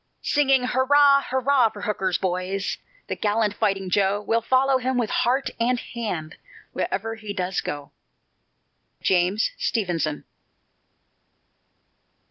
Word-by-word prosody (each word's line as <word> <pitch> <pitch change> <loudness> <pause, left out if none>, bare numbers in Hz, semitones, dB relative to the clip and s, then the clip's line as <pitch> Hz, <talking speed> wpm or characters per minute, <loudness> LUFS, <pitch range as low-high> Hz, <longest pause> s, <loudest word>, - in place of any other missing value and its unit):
Singing, 270 -3 +3
hurrah, 280 +3 +4
hurrah, 260 -2 +3
for 205 -1 -10
Hooker's 190 -4 0
boys, 185 +1 -2 0.3
The - - -4
gallant 210 0 0
Fighting 195 -2 -1
Joe, 200 +1 +2
We'll 225 +2 0
follow 260 +3 +2
him 255 0 -1
with 235 -4 0
heart 260 +3 +1
and 245 +1 +1
hand, 180 -12 -5 0.4
Wherever 220 +4 -2
he 215 -2 -7
does 185 -1 -2
go. 145 0 -6 1.1
JAMES 190 - +2
STEVENSON. 170 -8 -1
215 Hz, 110 wpm, -24 LUFS, 190-255 Hz, 1.1 s, hurrah